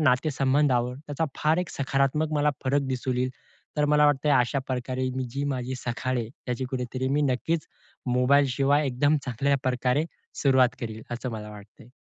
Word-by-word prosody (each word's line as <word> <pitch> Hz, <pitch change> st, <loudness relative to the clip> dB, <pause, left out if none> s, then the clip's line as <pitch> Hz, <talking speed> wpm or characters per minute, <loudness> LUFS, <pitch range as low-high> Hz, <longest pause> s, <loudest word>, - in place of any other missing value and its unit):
नातेसंबंधावर 130 Hz, -2 st, +2 dB
त्याचा 145 Hz, +2 st, -1 dB
फार 155 Hz, +2 st, +2 dB
एक 180 Hz, -1 st, -1 dB
सकारात्मक 140 Hz, +3 st, 0 dB
मला 150 Hz, 0 st, +3 dB
फरक 140 Hz, +2 st, +2 dB
दिसून 130 Hz, -1 st, -2 dB
येईल. 130 Hz, +1 st, 0 dB, 0.5 s
तर 150 Hz, -, +3 dB
मला 150 Hz, 0 st, +5 dB
वाटतंय 145 Hz, +1 st, +2 dB
अशा 125 Hz, +2 st, +1 dB
प्रकारे 130 Hz, 0 st, -2 dB
मी 130 Hz, -, -1 dB
जी 140 Hz, +3 st, -3 dB
माझी 130 Hz, +1 st, -3 dB
सकाळ 125 Hz, +1 st, -1 dB
आहे 115 Hz, -2 st, -3 dB, 0.2 s
त्याची 125 Hz, +1 st, -2 dB
कुठेतरी 130 Hz, 0 st, -2 dB
मी 145 Hz, +2 st, +2 dB
नक्कीच 160 Hz, +5 st, -1 dB, 0.4 s
मोबाईलशिवाय 140 Hz, +3 st, +3 dB
एकदम 145 Hz, +4 st, +2 dB
चांगल्या 135 Hz, +3 st, +1 dB
प्रकारे 125 Hz, +3 st, +1 dB, 0.4 s
सुरुवात 130 Hz, -3 st, +4 dB
करील, 110 Hz, -1 st, -5 dB
असं 125 Hz, +1 st, -4 dB
मला 105 Hz, -1 st, -6 dB
वाटतंय. 105 Hz, +2 st, -14 dB
130 Hz, 160 wpm, -26 LUFS, 125-145 Hz, 0.5 s, मला